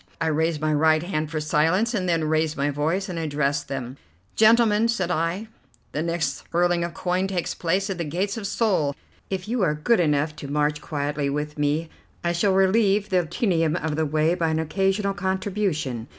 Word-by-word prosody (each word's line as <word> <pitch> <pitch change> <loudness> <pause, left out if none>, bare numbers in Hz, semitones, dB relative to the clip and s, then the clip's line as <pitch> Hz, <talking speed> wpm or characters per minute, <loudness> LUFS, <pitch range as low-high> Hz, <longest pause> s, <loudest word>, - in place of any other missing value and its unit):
I 165 - 0
raised 160 0 0
my 155 0 0
right 155 +1 +3
hand 155 -4 -2
for 155 -1 -2
silence, 165 +9 +1
and 185 -5 -1
then 165 -2 +1
raised 155 0 0
my 145 +1 0
voice 160 +7 -1
and 175 -3 -4
addressed 145 -2 -1
them: 130 -1 -5 0.4
"Gentlemen," 220 0 +5
said 195 -7 -1
I, 175 +6 -1 0.4
"the 150 - -2
next 165 -4 -2
hurling 175 0 +2
of 170 -1 -4
coin 185 +1 0
takes 185 -3 -2
place 185 +4 0
at 190 -3 -4
the - - 0
gates 180 +6 -2
of 215 -3 -4
Seoul. 185 -11 +1 0.3
If 190 -1 -3
you 235 +1 -1
are 160 -5 +2
good 185 +9 +2
enough 150 -2 +1
to 140 - -7
march 150 +1 0
quietly 145 -1 -2
with 150 +1 -3
me, 150 +3 0 0.4
I 170 - +1
shall 175 +4 +2
relieve 200 +1 +3
the 180 -3 +1
tedium 165 -4 +1
of 160 -3 -2
the 160 0 0
way 155 +3 +2
by 170 -2 0
an 160 - 0
occasional 195 +5 0
contribution. 190 - -2
165 Hz, 195 wpm, -24 LUFS, 150-190 Hz, 0.4 s, Gentlemen